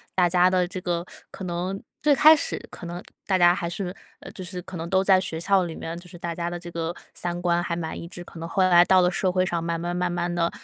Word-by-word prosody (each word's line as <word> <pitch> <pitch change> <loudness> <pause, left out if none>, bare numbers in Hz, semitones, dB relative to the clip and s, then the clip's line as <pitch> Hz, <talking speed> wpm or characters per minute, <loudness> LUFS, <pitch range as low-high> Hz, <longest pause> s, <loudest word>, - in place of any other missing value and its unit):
大 180 -2 +4
家 180 +1 +4
的 185 -1 +2
这 185 +1 -5
个， 175 -1 -2 0.3
可 190 - -8
能 180 +2 -3 0.2
最 300 - +5
开 310 +3 +8
始 - - -2
可 175 - -9
能 175 +1 -6 0.3
大 190 -2 +3
家 175 -1 +6
还 170 -3 -3
是， 180 0 -3 0.3
呃， - - -9
就 - - -8
是 180 0 -5
可 185 - -10
能 165 +1 -5
都 190 +1 +3
在 190 -1 +5
学 165 -3 -3
校 195 +2 +3
里 165 -2 -6
面， 165 +1 -6
就 180 - -12
是 175 - -12
大 170 0 -4
家 170 0 -2
的 175 - -4
这 175 0 -8
个 165 0 -3 0.2
三 175 0 -3
观 175 -1 +2
还 170 - -2
蛮 160 -2 -4
一 170 - -7
致。 175 0 -8
可 170 - -12
能 165 - -5
后 190 - +2
来 175 -1 +7
到 185 -1 +5
了 180 - +4
社 185 - +1
会 185 0 +2
上， 170 -2 -1
慢 170 0 -2
慢 175 +1 -3
慢 180 0 0
慢 175 0 -2
地， 170 -1 +1
175 Hz, 305 characters per minute, -25 LUFS, 170-185 Hz, 0.3 s, 开